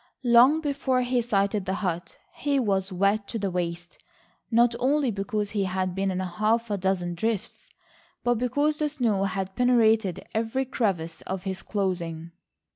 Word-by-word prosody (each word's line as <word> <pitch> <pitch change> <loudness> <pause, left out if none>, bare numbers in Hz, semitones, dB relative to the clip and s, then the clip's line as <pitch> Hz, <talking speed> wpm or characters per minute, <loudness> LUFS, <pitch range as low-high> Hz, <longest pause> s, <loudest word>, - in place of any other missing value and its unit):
Long 250 +6 +6
before 275 -4 0
he 245 0 +1
sighted 200 -3 0
the 190 0 -1
hut, 175 -4 -3 0.2
he 285 0 0
was 195 -4 0
wet 200 +3 +1
to 230 - -4
the 200 -3 -2
waist, 175 -1 -4 0.5
not 235 0 +4
only 275 0 +2
because 205 0 -2
he 205 -2 0
had 185 -1 -1
been 195 +1 -1
in 185 -1 -2
half 215 +5 0
a 205 - 0
dozen 180 -2 0
drifts, 220 +3 -3 0.5
but 240 -2 +1
because 290 +5 +1
the 300 -1 +1
snow 230 -9 0
had 190 0 -3
penetrated 225 -6 +3
every 230 +4 -1
crevice 190 -11 -2
of 190 -1 -4
his 190 -1 -3
clothing. 170 -5 -3
205 Hz, 160 wpm, -26 LUFS, 190-240 Hz, 0.5 s, Long